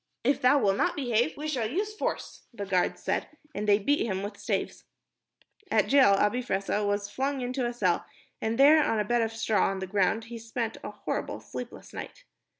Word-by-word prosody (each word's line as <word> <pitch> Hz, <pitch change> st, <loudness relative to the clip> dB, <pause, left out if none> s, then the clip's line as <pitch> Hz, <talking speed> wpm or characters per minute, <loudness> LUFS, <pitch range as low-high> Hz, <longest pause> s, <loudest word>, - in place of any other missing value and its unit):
"If 270 Hz, +3 st, +2 dB
thou 255 Hz, +3 st, +5 dB
wilt 195 Hz, -7 st, +2 dB
not -, -, +1 dB
behave, 245 Hz, 0 st, 0 dB
we 300 Hz, +1 st, -4 dB
shall 250 Hz, -8 st, -1 dB
use 410 Hz, -, -2 dB
force," -, -, -4 dB
the 205 Hz, -4 st, -6 dB
guards 185 Hz, -2 st, 0 dB
said, -, -, -1 dB, 0.3 s
and 210 Hz, -3 st, -3 dB
they 205 Hz, -1 st, +6 dB
beat 285 Hz, +9 st, +1 dB
him 190 Hz, -3 st, -2 dB
with 205 Hz, -, -5 dB
staves. -, -, -3 dB, 0.8 s
At -, -, +4 dB
the -, -, -7 dB
jail, 270 Hz, -7 st, +7 dB
Abi 210 Hz, +5 st, +2 dB
Fressah 205 Hz, -3 st, -1 dB
was 205 Hz, 0 st, 0 dB
flung 270 Hz, +5 st, -2 dB
into 250 Hz, 0 st, -1 dB
a -, -, -2 dB
cell, 185 Hz, -8 st, 0 dB, 0.4 s
and 225 Hz, +1 st, -1 dB
there, 300 Hz, +3 st, +7 dB
on 225 Hz, -, +1 dB
a 210 Hz, -, 0 dB
bed 240 Hz, +3 st, +2 dB
of 225 Hz, -1 st, 0 dB
straw 225 Hz, -3 st, +1 dB
on 195 Hz, -, -3 dB
the 190 Hz, -, -4 dB
ground, 200 Hz, +3 st, +1 dB
he 230 Hz, +1 st, -8 dB
spent 225 Hz, 0 st, -4 dB
a -, -, -4 dB
horrible, -, -, -4 dB
sleepless 245 Hz, -1 st, -9 dB
night. -, -, -8 dB
230 Hz, 210 wpm, -28 LUFS, 205-260 Hz, 0.8 s, jail